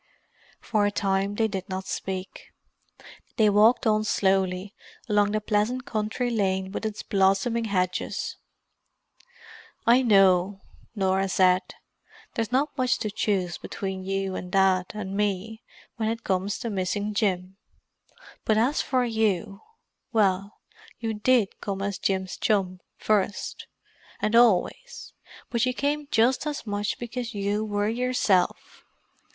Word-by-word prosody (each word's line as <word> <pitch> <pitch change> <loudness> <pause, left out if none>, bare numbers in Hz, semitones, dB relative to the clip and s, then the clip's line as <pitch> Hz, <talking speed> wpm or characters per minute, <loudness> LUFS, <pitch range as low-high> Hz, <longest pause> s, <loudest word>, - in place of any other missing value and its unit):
For 210 -2 +1
a - - -1
time 195 0 0
they 220 +1 +2
did 195 -2 -5
not 190 0 -4
speak. 190 0 -5 0.9
They 215 -3 +5
walked 215 +4 +4
on 215 -1 +3
slowly, 190 -1 0 0.3
along 205 -2 +2
the 215 - +1
pleasant 215 +5 0
country 220 +3 -2
lane 190 -3 0
with 220 - -3
its 215 -1 -6
blossoming 195 +4 +2
hedges. 185 -3 -2 1.5
"I 240 +3 +6
know," 195 -4 +4 0.3
Norah 190 -1 +1
said. 185 -1 +4 0.7
"There's 230 -1 -2
not 280 +4 +1
much 255 -2 +1
to 215 -2 -3
choose 190 -4 -1
between 190 -1 -5
you 195 0 -2
and 180 - -6
Dad 190 -2 +3
and 195 -2 -5
me, 210 +2 -2 0.4
when 220 -1 0
it 230 +1 -4
comes 190 +2 -1
to 230 - -3
missing 205 +2 -2
Jim. 190 -2 -1 0.9
But 215 - +2
as 250 +7 +2
for 255 -2 +1
you—well 210 - -2 0.4
you 225 -1 -3
did 220 -1 +1
come 195 -1 -3
as 200 -1 -3
Jim's 190 -1 -1
chum 190 -3 0 0.2
first—and 215 +1 -3
always; 240 - +2 0.4
but 235 -1 +1
you 255 - -1
came 290 +2 -1
just 250 +4 +2
as 295 -4 -4
much 205 -1 -2
because 240 -1 -5
you 205 +1 -1
were 205 -1 -1
yourself. 230 -5 0
205 Hz, 130 wpm, -26 LUFS, 190-225 Hz, 1.5 s, I